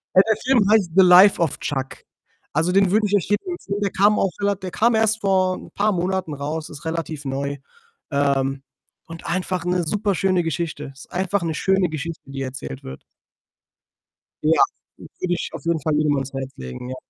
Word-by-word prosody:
Ja, 185 - +9
der 220 - +3
Film 245 -6 +3
heißt 205 -6 +3
„The 190 - +8
life 185 +2 +7
of 160 - 0
Chuck“. 135 -2 -4 0.5
Also, 165 +4 +1
den 195 0 +4
würde 215 +1 +3
ich 205 - +1
echt 195 -4 0
jedem 205 - 0
empfehlen. 205 -12 -4
Der 200 -2 0
kam 205 +2 +3
auch 195 - +1
rela 200 0 +2
der 185 -1 -7
kam 235 +1 +2
erst 220 0 +2
vor 185 -2 +2
'n - - -11
paar 210 +1 +1
Monaten 185 -2 -1
raus, 150 +3 -4
ist 155 +2 -11
relativ 160 -3 -4
neu, 140 +1 -3 0.5
ähm, 135 -1 0 0.4
und 165 0 -10
einfach 180 0 -2
'ne 180 0 +1
superschöne 190 0 +1
Geschichte. 160 -3 -3
Ist 135 - -15
einfach 190 +1 -1
'ne 165 -2 -1
schöne 190 +2 +1
Geschichte, 160 +1 -5
die 135 - -5
erzählt 130 0 -6
wird. 65 - -9 1.4
Ja, - - +4 0.4
den - - -12
würde 180 -1 0
ich 175 - -3
auf - - -8
jeden 170 -1 +1
Fall 155 0 0
jedem 150 -1 +2
ans 135 -1 -3
Herz 135 0 -4
legen, 65 - -7
ja. 130 - -4
175 Hz, 195 wpm, -22 LUFS, 145-195 Hz, 1.4 s, Ja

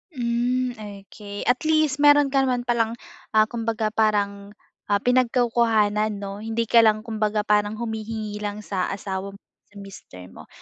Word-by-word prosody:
Hmm, 245 +1 0
okey 205 0 -9
at 250 0 +2
least 310 -3 +2
meron 290 -1 +5
ka 275 - +2
naman 255 -2 0
palang 230 -1 0 0.4
ah, 215 - +7
kumbaga 225 -1 -2
parang 205 -2 -1 0.3
ah, 205 0 +1
pinagkukuhanan 230 -4 +2
'no, 200 0 -7
hindi 225 +2 -2
ka 230 +1 +4
lang 215 -1 +4
kumbaga 215 -2 -1
parang 210 0 +1
humihingi 220 -2 -5
lang 210 0 -5
sa 190 -3 -2
asawa 195 0 -5
mo, - - -16 0.3
sa 205 - -27
mister 195 - -11
mo. - - -13
215 Hz, 155 wpm, -23 LUFS, 205-235 Hz, 0.4 s, ah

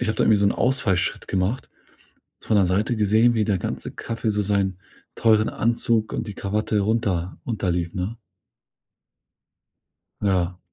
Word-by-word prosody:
ich 120 - -1
habe 110 - 0
da - - +2
irgendwie 110 - +5
so 100 - +1
'n - - +3
Ausfallschritt 120 -8 0
gemacht, 95 +6 -1 0.7
so - - -16
von 110 - +4
der 95 - +4
Seite 105 +6 0
gesehen, 110 +3 +4
wie 110 -2 +1
der 100 -2 +1
ganze 90 - -4
Kaffee 115 0 -4
so 105 0 +1
seinen 100 -2 0 0.4
teuren 110 -1 +3
Anzug 115 -1 0
und 115 - -3
die 105 - -5
Kawatte 105 +1 -1
runter 100 -5 -1
unterlief, 90 -7 -1
ne? 95 +5 -3 2.0
Ja. 90 -3 0
105 Hz, 155 wpm, -23 LUFS, 95-110 Hz, 2.0 s, irgendwie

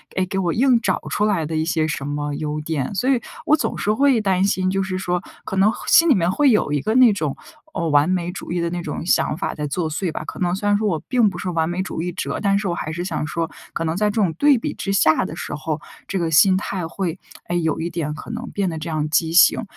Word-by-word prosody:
哎， 185 - +1
给 195 +1 -4
我 175 -3 0
硬 250 0 +4
找 - - 0
出 210 - +1
来 195 -7 +1
的 160 +1 -4
一 155 0 0
些 160 -1 0
什 150 -3 -3
么 145 0 -3
优 150 0 -3
点。” 150 +1 -3
所 250 +8 0
以 260 -3 +2 0.2
我 305 - +5
总 315 - -2
是 210 - 0
会 270 -1 +3
担 190 -2 +1
心， 190 -2 +1
就 195 +1 0
是 190 -1 -3
说 180 -1 -1 0.2
可 - - -4
能 195 +3 +4 0.2
心 335 0 +6
里 285 - +6
面 180 -1 +1
会 290 +6 +3
有 210 -9 +2
一 145 -2 0
个， 215 - -1
哦， - - 0
那 250 -4 +7
种 155 -8 -2 0.6
完 145 +3 +4
美 180 -1 -1
主 180 - -8
义 175 - -1
的 170 0 -1
那 175 0 -3
种 165 - -5
想 165 -3 +1
法 - - -2
在 150 -1 -4
作 160 +3 -2
祟 165 +3 -2
吧。 - - -5
可 - - -8
能 175 -1 +1
虽 205 +2 -3
然 205 0 +4
说 215 0 0
我 165 -5 0
并 240 -5 +3
不 180 - -8
是 185 - -3
完 165 -2 0
美 175 +2 -2
主 175 - -4
义 180 +1 -3
者， - - -3
但 200 -1 +2
是 200 0 -2
我 175 - 0
还 155 -2 -4
是 170 +2 -4
想 180 - -2
说， 165 +1 -2 0.2
可 - - -2
能 160 0 -1
在 210 +3 +1
这 205 - -5
种 180 -5 +1
对 285 - +4
比 230 - -3
之 195 - -4
下 155 -5 +3
的 155 - -6
时 170 - -6
候， 155 +1 -3 0.3
这 195 - -2
个 165 -3 -1
心 185 +4 +5
态 185 -3 -3
会， 180 0 -4 0.3
哎， 175 - -3
有 160 -2 0
一 170 - -2
点 165 -3 -3
可 155 - -8
能 240 +1 -5
变 195 -2 -1
得 160 -2 -5
这 160 +2 -5
样 155 -1 -1
畸 160 +1 +1
形。 175 +6 +5
180 Hz, 305 characters per minute, -21 LUFS, 160-200 Hz, 0.6 s, 那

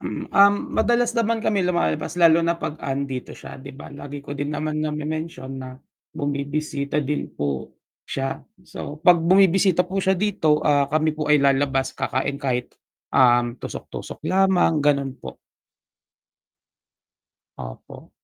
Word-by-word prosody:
Mm, - - -5
um, 200 0 +6 0.2
madalas 240 +1 +2
naman 230 0 +1
kami 200 -4 +1
lumalabas 175 - -1
lalo 165 0 +6
na 170 - +2
'pag 150 - -4
'andito 135 -2 -3
siya - - -10
'di 135 +1 -10
ba, 135 - -11
lagi 140 0 -8
ko 140 0 -7
din 145 +1 -3
naman 155 0 -2
name-mention 155 -2 -4
na 130 0 -9 0.3
bumibisita 145 0 -2
din 145 +1 -3
po 70 -2 -3 0.3
siya. 135 0 -4 0.2
So, 150 -4 -8
'pag 180 +1 +6
bumibisita 185 0 +4
po 190 - -4
siya 190 0 +2
dito, 175 -6 +1
ah, 145 -2 +3
kami 155 0 +1
po 150 -1 +1
ay 150 - +5
lalabas, 135 -1 +1
kakain 140 +2 -1
kahit, 130 -3 -3 0.3
um, 120 -1 +3
tusok-tusok - - -8
lamang, 185 -5 +3
gano'n 140 -2 +1
po. - - -10 2.2
Opo. - - -10
150 Hz, 140 wpm, -23 LUFS, 135-175 Hz, 2.2 s, um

